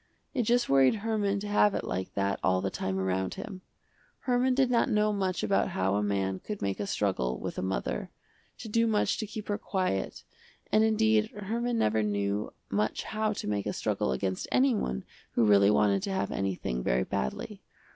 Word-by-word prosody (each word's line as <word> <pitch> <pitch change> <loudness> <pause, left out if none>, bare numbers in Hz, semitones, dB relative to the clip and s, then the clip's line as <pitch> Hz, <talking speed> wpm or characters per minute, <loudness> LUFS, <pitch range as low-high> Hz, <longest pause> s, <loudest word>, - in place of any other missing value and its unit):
It 255 - +1
just 240 0 +3
worried 135 +5 +5
Herman 205 -3 +1
to 210 - -5
have 205 0 +3
it - - -2
like 95 +1 -4
that 100 0 0
all 95 0 +2
the 95 +1 -2
time 95 0 -2
around 95 0 -1
him. 190 -3 -7 0.6
Herman 255 0 +2
did 260 -2 +3
not 240 +2 +3
know 210 -1 +2
much 190 -2 -1
about 195 - +2
how 95 +1 0
a 100 - +1
man 95 -2 -1
could 210 -1 -6
make 100 -1 -2
a 100 - -2
struggle 65 -14 0
with - - -4
a - - -2
mother, 95 +1 -2 0.5
to - - -8
do 230 +2 +2
much 215 -2 +1
to 215 - -3
keep 215 0 -7
her 205 +1 -1
quiet, 185 - -2 0.5
and 215 - +5
indeed 220 0 +3
Herman 230 +4 -2
never 110 - +2
knew 100 0 -1 0.2
much 105 +2 0
how 215 0 -1
to - - -5
make 100 -1 -1
a - - -1
struggle 65 - -1
against 95 +8 -2
anyone 230 - +2 0.3
who 115 - +3
really 100 -1 +6
wanted 105 -2 +3
to 195 - -3
have 190 - -1
anything 90 -11 -2
very - - +1
badly. 65 - -4
130 Hz, 195 wpm, -29 LUFS, -, 0.6 s, really